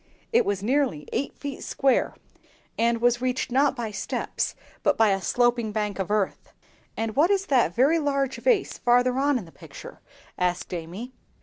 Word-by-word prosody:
It 470 - +4
was 200 -1 -1
nearly 245 - 0
eight 275 - -2
feet 280 -2 -6
square, 270 -2 +1 0.6
and 230 0 +1
was 240 0 +2
reached, 255 0 -1
not 275 +2 +3
by 235 -4 -4
steps, 200 - -3 0.3
but - - +2
by 225 -1 +5
a 195 0 0
sloping 240 0 +1
bank 210 -2 -2
of 190 - -2
earth." 210 -2 -1 0.5
"And 225 -1 -2
what 315 +5 +4
is 395 -1 +1
that 245 - +2
very 290 +7 +4
large 275 -3 0
vase 455 -6 +1
farther 245 +1 +3
on 285 0 +2
in 215 - -6
the 165 - -15
picture?" - - -12 0.4
asked 180 0 -1
Amy. 180 +9 -6
245 Hz, 175 wpm, -25 LUFS, 210-275 Hz, 0.6 s, by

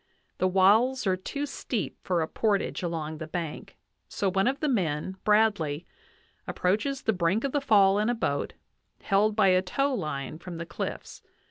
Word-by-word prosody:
The 185 - +3
walls 215 +8 +4
are 190 -1 +2
too 280 +10 -4
steep 225 - -4
for 175 -3 0
a - - -3
portage 205 0 0
along 160 -3 -4
the 160 - -6
bank; 165 -2 -6 0.3
so 195 -2 -1
one 195 +4 +2
of 270 +2 0
the 305 - 0
men, 185 - -1
Bradley, 205 -8 +2 0.6
approaches 220 +10 -1
the 220 - +2
brink 185 +4 +1
of 275 - -1
the 290 - 0
fall 200 -5 +4
in 215 +2 +1
a 245 - +1
boat, 145 -11 -2 0.5
held 205 +2 +2
by 210 -3 +4
a 185 0 +4
tow 275 +10 0
line 155 - -4
from 175 -1 -8
the 170 - -5
cliffs. - - -6
195 Hz, 175 wpm, -27 LUFS, 170-225 Hz, 0.6 s, walls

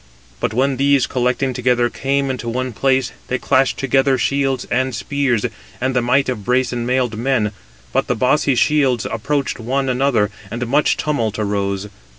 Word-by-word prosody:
But - - -1
when 130 +3 +1
these 140 -1 +3
collecting 125 +1 0
together 125 -1 +2
came 135 +2 -1
into 120 -2 -4
one 130 +1 -2
place, 130 +2 +1 0.2
they 130 - -1
clashed 130 +1 +2
together 135 0 +2
shields 135 0 0
and 130 -1 0
spears, 135 -2 0 0.3
and 130 +1 -1
the 125 - +3
might 130 +3 +2
of 120 -5 -3
brazen 125 0 0
mailed 125 -3 0
men; 115 -3 +1 0.4
but 135 +1 +1
the 125 - 0
bossy 130 +3 +2
shields 130 -3 +2
approached 140 +4 -2
one 130 +3 -1
another, 125 -5 +1 0.2
and 120 +3 -3
much 140 +5 +2
tumult 115 -8 -1
arose. 100 -1 -1
130 Hz, 160 wpm, -19 LUFS, 120-135 Hz, 0.4 s, these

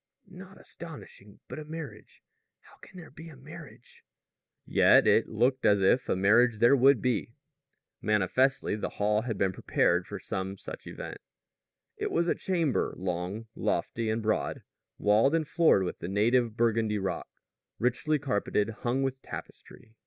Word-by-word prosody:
"Not 190 0 -13
astonishing. 150 -11 -12
But - - -7
a 155 - -8
marriage! 150 -9 -9 0.4
How - - -20
can 185 - -14
there 175 -3 -11
be 165 +1 -11
a 155 - -13
marriage?" 150 -1 -13 0.6
Yet - - +5
it - - +3
looked 125 +4 +1
as 100 -1 +4
if 95 +6 +2
a - - +2
marriage 110 +5 +4
there 120 +5 +5
would 135 0 +4
be. 120 -2 -1 0.7
Manifestly, 105 +6 +1
the 105 - -4
hall 105 +1 +1
had 115 -3 -4
been 95 -1 0
prepared - - +1
for - - -6
some 95 +1 -5
such - - -9
event. - - -8 0.8
It - - -2
was 170 +1 0
a - - +3
chamber 170 -7 -1
long, 90 +4 -4
lofty 115 -1 -2
and 110 +1 -1
broad, 110 0 -1 0.3
walled 110 +9 +3
and 160 -2 0
floored 160 - +3
with 90 - -5
the - - -5
native 115 +4 +1
Burgundy 115 -2 +1
rock, 95 -1 -4 0.5
richly 125 +6 0
carpeted, 105 -5 -1
hung 125 +3 -1
with 135 0 -3
tapestry. 110 - -11
120 Hz, 155 wpm, -28 LUFS, 105-140 Hz, 0.8 s, Yet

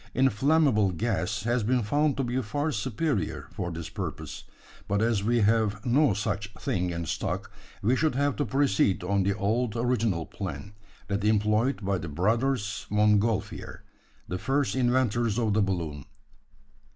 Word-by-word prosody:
Inflammable 135 - +3
gas 100 0 -1
has 120 +2 +1
been 120 +3 +1
found 145 +6 +1
to 135 - 0
be 125 +1 -1
far 145 +7 -2
superior 130 - -2
for 85 - -3
this 85 -1 -5
purpose; - - -6 0.4
but 100 +1 +1
as 110 -2 +1
we 120 +2 +2
have 105 -1 +2
no 130 -2 +3
such 105 0 -2
thing 90 -1 -1
in 85 -1 -3
stock, - - -3 0.3
we 120 +6 +3
should 155 -1 +1
have 140 0 +1
to 145 - +1
proceed 100 -8 +2
on 100 +2 +1
the 100 +1 0
old 110 +2 0
original 115 -8 0
plan 100 +1 -6 0.3
that 100 0 -2
employed 105 +3 +2
by 100 -1 0
the 80 - -6
brothers 110 - 0
Montgolfier 105 +1 +1 0.4
the 90 - -3
first 135 +4 0
inventors 120 -3 +1
of 110 -4 +1
the 105 - +3
balloon." 85 -8 -2
110 Hz, 150 wpm, -27 LUFS, 100-125 Hz, 0.4 s, Inflammable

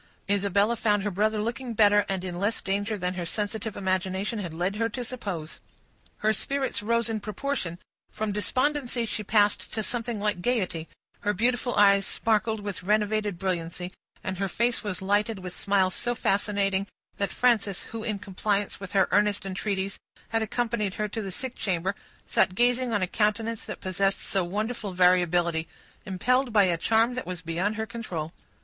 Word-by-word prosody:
Isabella 200 +2 +2
found 210 -2 +2
her 205 - -1
brother 215 +3 +1
looking 235 +2 -3
better, 205 -1 +5
and 190 -1 -1
in 175 -1 -4
less 205 +4 +1
danger 205 +2 -1
than 180 -1 -1
her 180 -2 -3
sensitive 210 +2 -3
imagination 190 +3 -1
had 175 -5 -4
led 180 +5 -1
her 230 +1 +1
to 245 +3 -4
suppose. 195 -11 -5 0.7
Her 215 - +5
spirits 275 +4 -1
rose 235 +2 +1
in 225 -1 -1
proportion; 210 -4 -3 0.3
from 215 -1 -2
despondency, 255 +3 0
she 215 -1 -3
passed 205 0 +2
to 220 - 0
something 235 -1 -2
like 205 -3 0
gayety; 185 -8 -1 0.3
her 205 - 0
beautiful 245 +4 +1
eyes 200 -1 +5
sparkled 220 -1 +1
with 200 -3 -4
renovated 210 0 +1
brilliancy; 180 -1 -3 0.3
and 190 -1 -3
her 195 -1 0
face 235 +5 +1
was 190 -3 -4
lighted 205 +3 +2
with 180 -1 -7
smiles 195 -2 +2
so 240 0 -1
fascinating, 200 -2 +1 0.3
that 200 -1 0
Frances, 220 -6 +2
who, 225 - -6
in 215 -2 -1
compliance 200 +1 -1
with 195 -1 -8
her 195 - +4
earnest 205 -1 +3
entreaties, 195 0 -2 0.3
had 225 0 +1
accompanied 220 -3 -1
her 210 - -1
to 225 +2 -3
the 195 - -4
sick 255 +7 -5
chamber, 190 -3 -1 0.3
sat 185 - +2
gazing 245 +2 +2
on 205 -4 +1
a - - +1
countenance 220 +3 0
that - - -6
possessed 195 +1 +1
so 195 -2 0
wonderful 210 +2 -3
variability, 175 -2 +3 0.4
impelled 250 +7 +2
by 210 -2 +6
a 180 -3 +3
charm 225 +7 +3
that 255 - -4
was 180 -2 -5
beyond 175 +6 -1
her 220 0 -2
control. 185 -8 -5
205 Hz, 175 wpm, -27 LUFS, 190-225 Hz, 0.7 s, by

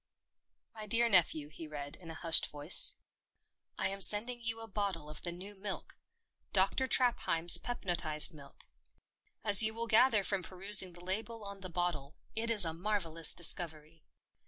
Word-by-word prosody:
" - - -57
My 215 -1 -6
dear 235 +3 +2
nephew," 165 -7 0
he 155 +2 -12
read, 145 0 -9
in 170 -3 -15
a 160 - -9
hushed 165 0 +4
voice. 145 +4 +4 0.4
" - - -50
I 190 - -2
am 195 0 -5
sending 235 +5 +4
you 230 0 -4
a 225 - -10
bottle 195 -7 -6
of 155 - -8
the 175 - -7
new 185 +4 -11
milk— 200 0 -9 0.6
Dr. 195 +7 0
Trapheim's 175 -10 +3
Pepnotised 175 -9 0
Milk. 140 -2 -17 0.8
As 205 -3 +5
you 220 0 0
will 230 0 -4
gather 230 -1 +2
from 195 0 -3
perusing 190 0 +1
the 175 +1 -14
label 220 +4 -6
on 200 -1 -10
the 185 -1 -9
bottle, 165 -5 -5 0.2
it 230 +1 -2
is 210 -5 +2
a 165 - -5
marvellous 165 -3 0
discovery. 160 -2 -1
190 Hz, 170 wpm, -31 LUFS, 165-215 Hz, 0.8 s, As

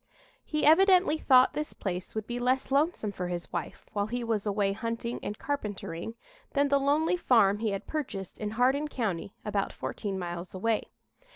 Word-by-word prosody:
He 305 -1 -1
evidently 360 0 +6
thought 255 -3 +5
this 300 0 -3
place 185 0 -4
would 220 -1 -2
be 240 +1 -4
less 255 +2 +1
lonesome 280 -6 +1
for 180 -2 -4
his 175 0 -5
wife, 170 -3 -4
while 205 -1 0
he 245 +2 -3
was 220 -3 -1
away 200 -1 +1
hunting 230 +2 -3
and 210 - -4
carpentering, 210 -7 -4 0.4
than 285 0 +3
the 280 0 +4
lonely 300 +5 +2
farm 210 - +4
he 220 -1 0
had 195 -1 -3
purchased 245 - -5
in 210 - -2
Hardin 265 +4 +3
County, 200 - -3
about 205 -2 -1
fourteen 200 -3 -4
miles 175 0 -5
away. 220 +3 0
225 Hz, 175 wpm, -29 LUFS, 200-280 Hz, 0.4 s, evidently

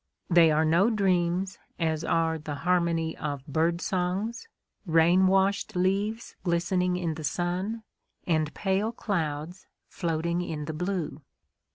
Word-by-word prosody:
They 170 -1 +7
are 155 +1 +3
no 170 +8 +4
dreams, 185 -3 +1 0.2
as 160 -2 -1
are 165 -1 +1
the 150 -1 -5
harmony 170 -2 +1
of 145 -3 -4
bird 165 +4 0
songs, 195 - -2 0.4
rain 175 +1 +4
washed 195 +2 +2
leaves 200 +5 0
glistening 180 +1 +1
in 170 -3 -1
the 155 0 -7
sun, 180 +8 -2 0.4
and 155 -3 +1
pale 195 +3 0
clouds 170 -5 -3 0.2
floating 170 0 -1
in 155 -4 -4
the 160 - -4
blue. 180 -1 -3
175 Hz, 130 wpm, -27 LUFS, 160-190 Hz, 0.4 s, They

